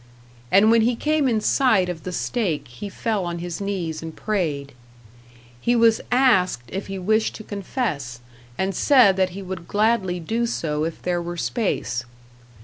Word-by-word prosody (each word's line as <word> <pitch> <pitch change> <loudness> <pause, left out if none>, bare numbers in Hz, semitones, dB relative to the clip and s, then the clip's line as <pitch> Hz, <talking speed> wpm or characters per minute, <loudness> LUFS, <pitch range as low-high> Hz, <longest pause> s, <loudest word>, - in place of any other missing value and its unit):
and 205 +3 +6
when 230 0 +5
he 235 +2 +2
came 300 +2 +1
in 225 -3 +2
sight 215 -5 +3
of 175 -3 -5
the 185 - -5
stake 185 -5 -2
he 125 +12 -8
fell 215 -1 -2
on 170 -1 -3
his 175 +1 -5
knees 180 -6 -3
and 160 -1 -7
prayed. 155 -10 -2 0.9
He 240 - +2
was 230 -1 +4
asked 230 - +3
if 195 +1 -5
he 195 0 -5
wished 215 +4 +1
to 215 - -8
confess, 195 - -3 0.4
and 190 +1 0
said 245 - +5
that 185 -1 +2
he 200 - -6
would 185 -2 -7
gladly 205 -4 +1
do 225 +8 -1
so 155 -8 -1
if 165 - -6
there 175 -1 0
were 175 0 -5
space. 120 - -1
190 Hz, 170 wpm, -23 LUFS, 170-225 Hz, 0.9 s, and